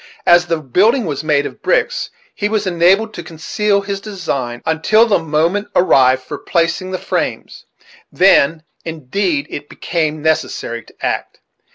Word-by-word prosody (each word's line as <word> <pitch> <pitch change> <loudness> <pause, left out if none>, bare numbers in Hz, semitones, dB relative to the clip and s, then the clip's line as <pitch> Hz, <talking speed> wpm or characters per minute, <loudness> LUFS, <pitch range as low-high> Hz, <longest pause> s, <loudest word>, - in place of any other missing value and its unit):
As 175 0 +5
the 165 - 0
building 200 - +2
was 150 -3 -3
made 150 -2 +1
of - - -8
bricks, - - 0 0.2
he 205 - -2
was 215 -1 0
enabled 190 +5 +2
to 175 - -6
conceal 200 +6 -1
his 200 0 -4
design 140 - -4
until 160 +8 +3
the 215 -6 +2
moment 165 +6 0
arrived 130 -7 +4
for 145 +2 -7
placing 170 +2 -1
the 185 - -3
frames; - - -4 0.4
then, 165 -4 +4 0.2
indeed, 160 0 -2
it 145 0 -7
became 155 -3 -2
necessary 155 -6 -1
to - - -9
act. - - -3
170 Hz, 150 wpm, -17 LUFS, 150-195 Hz, 0.4 s, As